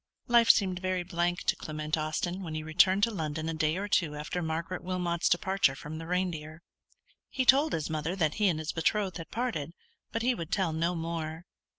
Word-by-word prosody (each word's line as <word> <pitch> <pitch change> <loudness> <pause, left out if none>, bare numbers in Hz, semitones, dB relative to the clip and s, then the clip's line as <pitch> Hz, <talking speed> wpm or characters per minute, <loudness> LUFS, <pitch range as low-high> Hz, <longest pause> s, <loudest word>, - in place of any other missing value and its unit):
Life 235 -2 +5
seemed 185 -4 +5
very 185 -1 -1
blank 175 0 -1
to - - +2
Clement 155 0 -3
Austin 160 +4 -2
when 160 -4 -5
he 155 - -3
returned 180 +5 +4
to 230 - +4
London 160 -4 -3
a 165 - -1
day 155 +1 0
or 200 +2 -3
two 165 -7 +1
after 150 +4 -3
Margaret 165 +2 -3
Wilmot's 180 -2 0
departure 190 -5 +2
from 150 +3 -7
the 165 - -7
Reindeer. 170 -3 -2 0.7
He 260 - -1
told 280 +4 +5
his 155 - -1
mother 160 +3 -2
that 155 -5 +1
he 205 - +5
and 170 -4 +2
his 155 0 -3
betrothed 190 +3 0
had 165 - -8
parted; 225 - -3 0.4
but 230 - -2
he 250 +1 +3
would 165 -8 -6
tell 185 -5 +1
no 165 +3 0
more. 165 0 -4
170 Hz, 205 wpm, -30 LUFS, 155-185 Hz, 0.7 s, Life